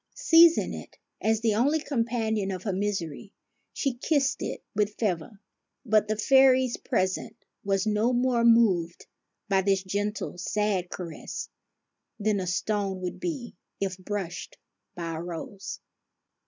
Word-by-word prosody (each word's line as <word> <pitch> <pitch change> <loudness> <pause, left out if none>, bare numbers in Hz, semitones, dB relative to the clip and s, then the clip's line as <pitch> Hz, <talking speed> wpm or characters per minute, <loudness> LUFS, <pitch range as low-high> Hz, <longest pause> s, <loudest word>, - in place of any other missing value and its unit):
Seizing 335 -8 +5
it, - - -9 0.2
as 220 0 +1
the 225 -2 +2
only 280 +9 +2
companion 230 -7 -1
of 185 -1 -4
her 200 - -1
misery, 195 -3 -3 0.4
she 275 -3 -1
kissed 275 +2 0
it - - -4
with 210 0 0
fervor; 195 -1 -2 0.5
but 215 -2 +3
the 215 - 0
fairy's 260 +2 +5
present 190 -7 -1 0.3
was 195 -1 +1
no 215 +3 +2
more 245 -1 +2
moved 205 -8 +3 0.4
by 195 -2 +3
this 195 0 +1
gentle 205 -1 -3
sad 195 -1 0
caress 170 -4 -6 0.7
than 210 -1 +1
a 185 - -3
stone 195 +1 -1
would 180 -1 -4
be 300 -9 -4 0.2
if 195 -2 -1
brushed 185 -2 -5 0.4
by 170 -2 -4
a 160 - -4
rose. 175 +3 -6
210 Hz, 135 wpm, -27 LUFS, 190-235 Hz, 0.7 s, Seizing